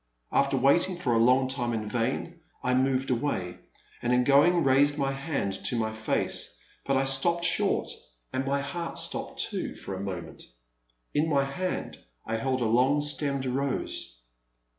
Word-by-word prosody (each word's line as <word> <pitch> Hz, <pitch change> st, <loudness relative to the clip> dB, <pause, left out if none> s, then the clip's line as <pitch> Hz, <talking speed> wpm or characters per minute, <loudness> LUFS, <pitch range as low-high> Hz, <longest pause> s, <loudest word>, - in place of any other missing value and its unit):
After -, -, +2 dB
waiting 175 Hz, +7 st, +3 dB
for 135 Hz, -9 st, 0 dB
a 115 Hz, -, +3 dB
long 130 Hz, +2 st, +4 dB
time 125 Hz, -3 st, -1 dB
in 110 Hz, -1 st, -3 dB
vain, 125 Hz, +10 st, -2 dB, 0.2 s
I 125 Hz, -, +1 dB
moved 130 Hz, +1 st, +1 dB
away, 115 Hz, -9 st, -2 dB, 0.4 s
and 120 Hz, -, 0 dB
in 125 Hz, 0 st, +4 dB
going 150 Hz, +6 st, +5 dB
raised 140 Hz, +2 st, +4 dB
my 135 Hz, -1 st, 0 dB
hand 135 Hz, -7 st, -2 dB
to -, -, +2 dB
my 110 Hz, -1 st, -1 dB
face, 110 Hz, 0 st, -1 dB, 0.3 s
but 135 Hz, -1 st, +2 dB
I 135 Hz, -, +2 dB
stopped 170 Hz, +6 st, +2 dB
short, -, -, +1 dB, 0.4 s
and 130 Hz, -, 0 dB
my 140 Hz, +1 st, 0 dB
heart 165 Hz, +5 st, -5 dB
stopped -, -, -3 dB
too, -, -, -3 dB
for 95 Hz, -, -7 dB
a 95 Hz, -, -5 dB
moment. 90 Hz, -4 st, -6 dB, 0.7 s
In 155 Hz, +2 st, +1 dB
my 140 Hz, -3 st, +3 dB
hand 180 Hz, +7 st, -4 dB, 0.3 s
I 115 Hz, 0 st, -2 dB
held 130 Hz, +2 st, -1 dB
a -, -, +1 dB
long 125 Hz, +6 st, +3 dB
stemmed 140 Hz, -2 st, 0 dB
rose. 130 Hz, -, -2 dB
135 Hz, 165 wpm, -28 LUFS, 120-145 Hz, 0.7 s, going